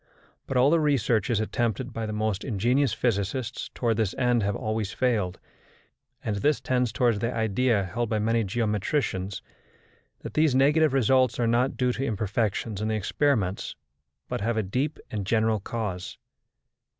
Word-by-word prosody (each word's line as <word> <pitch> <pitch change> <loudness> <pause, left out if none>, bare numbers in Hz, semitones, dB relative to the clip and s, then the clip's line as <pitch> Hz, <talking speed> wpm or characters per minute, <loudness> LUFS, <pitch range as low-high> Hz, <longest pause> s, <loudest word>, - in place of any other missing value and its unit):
But 135 - -1
all 130 +3 +5
the 170 - +4
researches 120 -7 +1
attempted 120 +3 -1
by 115 -1 -3
the - - -3
most 105 -2 -1
ingenious 125 +4 +1
physicists 115 +2 -2
towards 115 -3 0
this 110 -4 0
end 125 -2 +2
have 100 0 0
always 110 -1 -2
failed, 105 -8 0 0.9
and 105 -2 -1
this 145 +9 +2
tends 125 -2 0
towards 115 -2 +2
the 115 +3 -1
idea 115 -1 +1
held 110 +5 -3
by 110 - 0
many 115 +2 +1
geometricians 105 -1 -1 0.8
that - - -7
these 155 -4 +3
negative 145 +2 +4
results 130 -2 +3
are 120 - +2
not 120 +4 +1
due 125 -1 +2
to 135 - -3
imperfections 105 -2 -1
in 110 - -1
the 110 - 0
experiments, 105 -2 0 0.5
but - - -3
have 115 +2 0
a 110 - +1
deep 130 +10 -2
and 105 -2 -2
general 110 -1 +2
cause. 95 -4 -4
115 Hz, 160 wpm, -26 LUFS, 105-125 Hz, 0.9 s, all